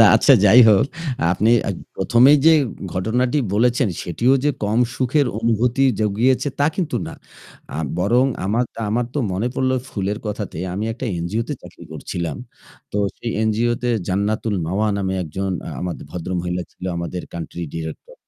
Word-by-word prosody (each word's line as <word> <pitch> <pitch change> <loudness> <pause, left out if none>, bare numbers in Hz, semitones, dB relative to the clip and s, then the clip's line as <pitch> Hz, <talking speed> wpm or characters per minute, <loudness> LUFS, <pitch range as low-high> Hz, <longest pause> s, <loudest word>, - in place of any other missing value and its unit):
আচ্ছা - - +6
যাই 110 +5 +8
হোক, 105 +1 +5 0.5
আপনি 105 +5 +2 0.5
প্রথমেই 130 +5 +5
যে 165 - +9 0.4
ঘটনাটি 120 +9 +1 0.2
বলেছেন 120 +2 +2
সেটিও 115 +9 +1
যে 150 - +4
কম 110 +3 +1 0.2
সুখের 135 +2 +1
অনুভূতি 115 +3 +1 0.2
জুগিয়েছে 115 +7 +2
তা 145 - +4
কিন্তু 175 -5 -1
না। - - -7 0.6
আ - - -3 0.2
বরং 115 +8 +3 0.2
আমার 110 +6 +1 0.2
আমার 120 +4 +1
তো - - 0
মনে 100 +7 -1
পড়ল 130 0 +1 0.2
ফুলের 100 -1 -2
কথাতে 105 -5 -4 0.2
আমি 100 +3 -2
একটা 125 +2 -5
এনজিও 90 +7 -1
তে - - -1
চাকরি - - -13
করছিলাম। 85 -2 -4 0.6
তো - - -2 0.2
সেই 115 - -4
এনজিও 110 +2 +1
তে 125 - +1 0.2
’জান্নাতুল 105 +3 0
মাওয়া’ 100 +6 0
নামে 95 -1 -1
১ 85 - -7
জন 95 0 -1 0.6
ভদ্রমহিলা 90 +1 -3
ছিল - - -11
আমাদের 85 +1 -4
কান্ট্রি 85 +1 -6
ডিরেক্টর। 80 -1 -7
110 Hz, 150 wpm, -21 LUFS, 95-125 Hz, 0.6 s, যে